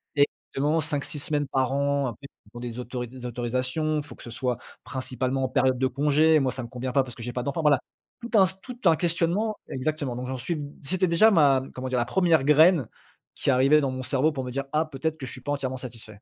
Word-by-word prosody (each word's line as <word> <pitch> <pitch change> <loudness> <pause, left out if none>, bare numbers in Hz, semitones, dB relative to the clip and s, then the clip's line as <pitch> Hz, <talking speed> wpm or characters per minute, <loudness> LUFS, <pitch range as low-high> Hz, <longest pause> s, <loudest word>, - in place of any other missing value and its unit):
exactement, 145 +2 +1
5-6 150 -1 -2
semaines 145 0 -1
par 130 -1 +1
an, 140 -1 +1
après 120 +4 -8 0.2
il 105 - -21
faut 120 - -8
des 120 0 -5
auto 125 0 -4
des 125 +1 -10
autorisations, 125 +6 -1
il 150 - -2
faut 120 - -11
que - - -14
ce 120 - -9
soit 125 0 -2 0.3
principalement 130 0 -2
en - - -3
période 130 -1 +2
de 130 - +3
congé, 150 +4 +3
moi, 130 -2 +1
ça 130 0 -6
me 120 - -6
convient 125 0 -4
pas 135 - +4
parce 125 -2 -10
que 120 - -10
j'ai 120 - -5
pas 125 - -2
d'enfant, 140 +4 -2
voila, 145 -4 +4 0.4
tout 235 - -7
un 190 - +7 0.2
tout 250 -1 -9
un 165 -2 +6
questionnement 175 +6 0
exactement. 140 -1 -2
Donc 125 +1 -5
j'en 130 0 -3
suis, 160 +5 -3 0.2
c'était 185 +5 +1
déjà 190 +7 +5
ma 140 -7 +4
comment 130 0 -5
dire, 125 -1 +1
la 120 - +1
1re 165 0 +3
graine 155 - +5 0.5
qui 140 - +1
arrivait 135 +4 +5
dans 135 - 0
mon 130 0 -5
cerveau 135 +4 +1
pour 130 -2 -3
me 125 - -5
dire: 140 +2 -3
«Ah, 155 +1 +3
peut-être 155 +2 -3
que 135 - -6
je 125 - -7
suis 130 - -9
pas 145 +3 -2
entièrement 130 -2 -3
satisfait». 120 -3 -9
135 Hz, 245 wpm, -26 LUFS, 125-155 Hz, 0.5 s, un